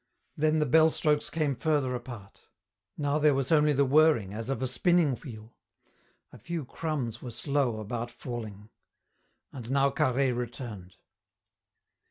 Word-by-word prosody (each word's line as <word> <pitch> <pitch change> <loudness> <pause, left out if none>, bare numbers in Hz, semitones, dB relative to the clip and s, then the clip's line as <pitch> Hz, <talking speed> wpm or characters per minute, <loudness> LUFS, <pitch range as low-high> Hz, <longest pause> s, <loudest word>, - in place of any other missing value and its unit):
Then 155 +1 +2
the 155 - +2
bell 160 +4 +5
strokes 150 -1 +1
came 155 -3 0
further 145 -3 0
apart. 120 -5 -9 0.5
Now 145 0 0
there 150 -2 +4
was 135 +1 -1
only 150 -1 +4
the 140 0 +3
whirring 140 -8 +3
as 115 +3 -6
of 135 - -1
a - - +1
spinning 165 +1 +2
wheel; 110 -5 -11 0.8
a - - -12
few 170 -4 -5
crumbs 130 -6 -4
were 125 - -6
slow 130 -2 -1
about 115 +3 -4
falling. 110 -4 -8 0.8
And 120 -4 -8
now 140 +1 +2
Carhaix 130 -3 +1
returned. 115 -6 -6
135 Hz, 145 wpm, -28 LUFS, 120-150 Hz, 0.8 s, bell